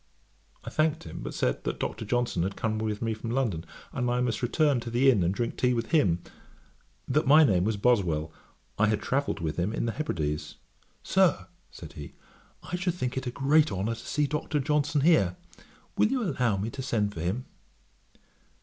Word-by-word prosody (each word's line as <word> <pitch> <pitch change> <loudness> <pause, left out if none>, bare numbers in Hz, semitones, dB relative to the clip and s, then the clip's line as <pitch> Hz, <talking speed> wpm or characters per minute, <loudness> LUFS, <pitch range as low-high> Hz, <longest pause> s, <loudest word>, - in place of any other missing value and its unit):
I - - -7
thanked 160 +1 +1
him, - - -8
but - - -6
said, 60 - 0
that - - -3
Dr. 110 - -3
Johnson 120 -4 0
had 95 +3 -2
come 110 -1 -1
with 110 0 -2
me 115 -1 0
from 110 +1 -6
London, 115 -10 -1 0.3
and 125 0 -1
I 120 0 +1
must 120 -3 -1
return 140 +2 +2
to 120 - -6
the 130 +3 +4
inn 110 -7 +2
and 85 +1 +2
drink 115 +4 -2
tea 125 -1 +2
with 115 -1 -3
him; 95 - +3 0.8
that 145 +2 +1
my 155 +3 +8
name 95 -9 +3
was 110 -1 0
Boswell, 90 -9 +1 0.5
I 110 - +4
had 105 0 +1
travelled 135 -7 -1
with 80 -2 -3
him 90 +4 0
in 115 - -2
the 115 - 0
Hebrides. 80 - -3 0.5
'Sir, 185 - +3 0.2
(said - - -11
he) 75 -1 -9 0.5
I 180 - -4
should 180 -1 -1
think 125 -7 -3
it 130 -1 -3
a - - +1
great 145 +4 +3
honour 100 +4 -1
to 115 +1 -9
see 150 - +1
Dr. 150 +1 -1
Johnson 145 0 +1
here. 135 - +4 0.6
Will - - +4
you 255 +1 0
allow 125 - 0
me 105 +4 -3
to 135 - -6
send 105 -6 0
for 80 - -6
him?' 95 +10 -2
120 Hz, 200 wpm, -28 LUFS, 100-145 Hz, 0.8 s, my